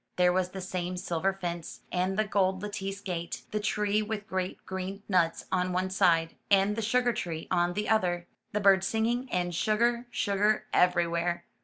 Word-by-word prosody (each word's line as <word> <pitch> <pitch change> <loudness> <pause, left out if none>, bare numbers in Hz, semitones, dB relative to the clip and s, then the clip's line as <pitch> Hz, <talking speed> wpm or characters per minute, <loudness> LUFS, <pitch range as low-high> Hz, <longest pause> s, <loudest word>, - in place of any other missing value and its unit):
There 180 0 +4
was 185 0 +1
the 190 +1 -7
same 180 -1 -3
silver 180 +1 0
fence, 175 -3 -5
and 185 +2 0
the 215 - +3
gold 190 -2 +1
lattice 200 -1 -4
gate, 175 -4 -4
the 215 - 0
tree 210 0 +1
with 215 0 -3
the - - -27
great 185 0 -3
green 190 +1 -5
nuts 175 -4 +1
on 180 -1 +1
one 185 +1 0
side, 165 -3 +3
and 200 +1 +4
the 225 - -2
sugar 245 +2 +2
tree 165 -6 -4
on 175 -1 +2
the 210 +3 -2
other, 175 -5 +1 0.3
the 210 - 0
birds 195 -1 +5
singing, 235 +3 0
and 175 -1 0
sugar, 235 +6 +1
sugar 210 -1 +1
everywhere. 175 -1 +2
190 Hz, 180 wpm, -29 LUFS, 180-210 Hz, 0.3 s, birds